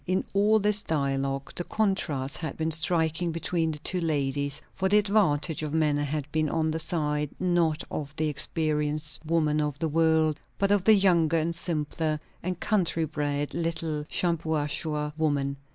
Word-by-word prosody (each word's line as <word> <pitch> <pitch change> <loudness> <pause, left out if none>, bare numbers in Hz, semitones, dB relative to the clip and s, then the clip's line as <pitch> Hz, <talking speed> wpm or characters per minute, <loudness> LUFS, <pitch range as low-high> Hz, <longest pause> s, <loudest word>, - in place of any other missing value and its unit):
In 185 +1 0
all 205 +2 +4
this 210 0 +2
dialogue, 135 -3 -1
the 175 - -1
contrast 175 -11 -1
had 155 -5 -5
been 160 0 -1
striking 160 +1 0
between 165 0 -1
the 150 - -2
two 180 +5 +1
ladies; 140 -2 0
for 190 0 0
the 205 - +6
advantage 190 -7 +2
of 155 0 -3
manner 150 -2 +2
had 145 0 -3
been 155 -1 +1
on 160 0 0
the 160 - -2
side, 150 -2 -1
not 170 -3 +1
of 145 -1 -5
the 155 +1 0
experienced 150 +1 -1
woman 155 -2 +2
of 150 -2 -2
the 160 +1 -1
world, 160 -1 +2 0.2
but 200 0 +1
of 200 -2 +2
the 220 - +8
younger 170 -5 +3
and 165 +1 -1
simpler 155 -2 -2 0.2
and 180 0 -3
country 175 -6 +1
bred 145 -1 -2
little 165 -2 -1
Shampuashuh 155 -2 -1
woman. 140 -3 0
160 Hz, 165 wpm, -27 LUFS, 150-170 Hz, 0.2 s, the